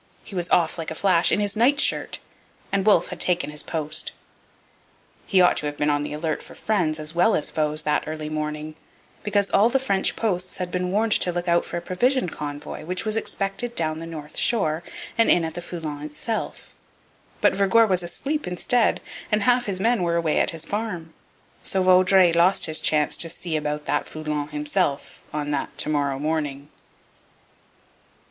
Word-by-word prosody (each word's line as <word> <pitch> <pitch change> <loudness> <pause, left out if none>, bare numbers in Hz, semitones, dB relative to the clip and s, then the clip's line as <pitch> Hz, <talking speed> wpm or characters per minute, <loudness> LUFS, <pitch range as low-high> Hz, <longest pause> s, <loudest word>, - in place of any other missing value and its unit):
He - - -12
was 175 -2 -2
off, 170 0 +2
like 160 - -4
a 160 - -5
flash, 180 -1 +3
in - - +2
his 205 0 -1
nightshirt, 270 +7 +2 0.5
and 195 +1 0
Wolfe 180 -5 +4
had - - -7
taken 180 -4 0
his 150 - -2
post. 155 -1 -2 1.1
He 190 -2 +4
ought 180 - +4
to 150 - -1
have 145 0 -5
been 145 0 +1
on 145 0 +1
the 145 - -4
alert 155 +1 -2
for - - -13
friends 175 -8 0
as 155 +1 -4
well 180 +6 +3
as 150 - 0
foes 155 0 +1
that 150 - +1
early 155 -1 -4
morning, 155 0 -4 0.5
because 205 -1 0
all 210 +4 +5
the 270 - +2
French 220 -8 0
posts 185 -5 -2
had 180 -1 -4
been 180 0 -1
warned 215 +4 +1
to 180 - +2
look 175 +1 -3
out 170 0 +3
for - - -5
a 170 - -5
provision 245 +3 +1
convoy 150 -1 -6
which 180 +5 -2
was 215 0 0
expected 225 +2 -2
down 155 -1 -1
the 165 - -7
north 155 -2 -9
shore 165 -9 +1 0.4
and 230 - +5
in 170 -2 +4
at 160 - -5
the 175 - -6
Foulon 160 -4 -6
itself. 155 +9 -4 0.7
But - - +4
Vergor 200 +4 +4
was 185 -4 +1
asleep 275 - -3
instead, 220 +6 +1 0.3
and 210 -1 +2
half 245 +1 +3
his 190 -2 -1
men 230 +1 +2
were 170 -1 +1
away 165 -2 +1
at - - +2
his 165 -1 -2
farm. 190 -7 -4 0.5
So 190 -1 0
Vaudreuil 185 -1 +5
lost 175 +3 +4
his 155 -1 +3
chance 150 -1 +2
to 165 - +3
'see 170 0 -4
about 150 0 -2
that 145 - 0
Foulon 150 -2 -3
himself' 150 0 -2
on 150 -1 -3
that 145 - -3
'to - - -1
morrow 145 -3 0
morning.' 145 -1 -3
170 Hz, 190 wpm, -24 LUFS, 155-195 Hz, 1.1 s, all